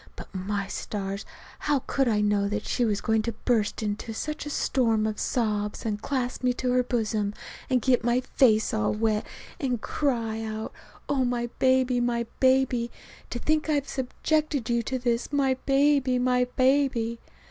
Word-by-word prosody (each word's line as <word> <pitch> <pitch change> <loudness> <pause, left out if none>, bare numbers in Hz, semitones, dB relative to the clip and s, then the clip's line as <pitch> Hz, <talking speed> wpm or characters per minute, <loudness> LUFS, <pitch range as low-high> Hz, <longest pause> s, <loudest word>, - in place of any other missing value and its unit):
But, - - -11
my 195 +1 -2
stars! 200 -1 -4 0.3
How 285 -3 0
could 270 -2 +1
I 215 -2 +2
know 205 -1 +2
that 210 +1 -3
she 245 - 0
was 210 -3 0
going 220 -1 +2
to 230 +1 -3
burst 225 -3 +1
into 215 +2 -3
such 300 +4 -4
a - - -3
storm 230 -6 +1
of 215 -1 -2
sobs 210 -4 -1
and 210 -2 -2
clasp 255 -2 -2
me 250 0 +3
to 250 0 -1
her 250 0 +4
bosom, 215 -4 -1 0.3
and 255 -3 +2
get 250 -3 +3
my 240 +2 +2
face 220 -4 +3
all 105 - +1
wet 215 -1 0 0.3
and 250 -4 -1
cry 230 -5 -1
out: 220 0 -5 0.3
"Oh, 275 -2 +1
my 240 -1 -1
baby, 260 -1 +3
my 240 -1 0
baby 260 -2 +3 0.4
to - - -3
think 310 +5 0
I - - +3
have 285 -1 0
subjected 280 -1 -1
you 235 0 +2
to 260 +3 -2
this, 240 0 -1
my 275 -2 +2
baby, 275 -2 +3
my 250 0 +2
baby!" 255 -3 +1
240 Hz, 175 wpm, -27 LUFS, 220-260 Hz, 0.4 s, her